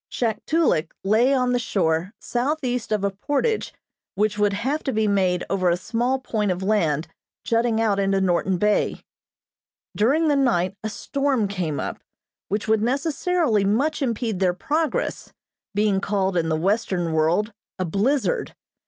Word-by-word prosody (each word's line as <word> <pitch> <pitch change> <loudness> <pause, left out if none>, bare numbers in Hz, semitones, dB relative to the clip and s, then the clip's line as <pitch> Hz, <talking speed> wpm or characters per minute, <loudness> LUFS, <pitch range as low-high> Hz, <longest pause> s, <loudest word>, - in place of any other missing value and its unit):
Shaktolik 235 - 0
lay 220 +7 +3
on 250 -2 +2
the 245 - +2
shore 180 -6 0
southeast 250 -2 -2
of 210 -2 0
a 200 - +1
portage 290 - -1 0.4
which 210 +1 +1
would 205 -1 +3
have 265 +9 -1
to 270 - 0
be 220 -2 +1
made 185 -3 +1
over 185 -2 +1
a 170 - +2
small 240 +7 0
point 220 -5 -2
of 180 +1 -2
land 165 -7 +1 0.4
jutting 230 -1 +1
out 210 -3 +2
into 195 0 +2
Norton 185 0 +1
Bay. 210 +3 +1 0.9
During 285 +10 +3
the 295 - +3
night 205 -9 +1
a 220 - -2
storm 275 -1 -1
came 180 -7 -3
up - - -4 0.5
which 205 +2 -2
would 220 -1 +3
necessarily 280 - +1
much 270 +11 +1
impede 230 -5 -1
their 180 -2 +2
progress, 300 - -2 0.4
being 205 -2 +2
called 195 -2 0
in 165 -2 +1
the 160 - +1
western 185 -2 0
world 170 +8 +1 0.2
a 185 - -1
"blizzard." 260 - 0
210 Hz, 155 wpm, -23 LUFS, 190-250 Hz, 0.9 s, lay